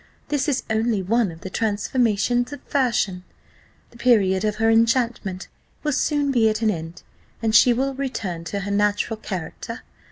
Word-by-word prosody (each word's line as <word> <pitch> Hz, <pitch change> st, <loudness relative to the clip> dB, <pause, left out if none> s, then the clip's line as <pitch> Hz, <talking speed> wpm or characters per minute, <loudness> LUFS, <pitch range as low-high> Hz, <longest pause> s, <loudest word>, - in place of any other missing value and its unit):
This 290 Hz, 0 st, 0 dB
is 275 Hz, -, 0 dB
only 220 Hz, -2 st, 0 dB
one 225 Hz, +2 st, +2 dB
of 165 Hz, +1 st, -13 dB
the 190 Hz, -, -7 dB
transformations 230 Hz, +3 st, 0 dB
of 290 Hz, -, -7 dB
fashion 230 Hz, -9 st, 0 dB, 0.7 s
the 235 Hz, -, -16 dB
period 205 Hz, -6 st, +3 dB
of 210 Hz, -1 st, 0 dB
her 225 Hz, +1 st, +1 dB
enchantment 230 Hz, -4 st, +1 dB, 0.4 s
will 300 Hz, -, 0 dB
soon 290 Hz, 0 st, +1 dB
be 230 Hz, -4 st, +4 dB
at 215 Hz, +1 st, -2 dB
an 215 Hz, -, +4 dB
end, 165 Hz, -1 st, -7 dB, 0.4 s
and 225 Hz, -2 st, 0 dB
she 245 Hz, -, +7 dB
will 265 Hz, +3 st, 0 dB
return 225 Hz, -11 st, -4 dB
to 200 Hz, +4 st, -3 dB
her 200 Hz, +1 st, -4 dB
natural 205 Hz, +2 st, +1 dB
character. 215 Hz, +4 st, -6 dB
225 Hz, 165 wpm, -23 LUFS, 200-245 Hz, 0.7 s, she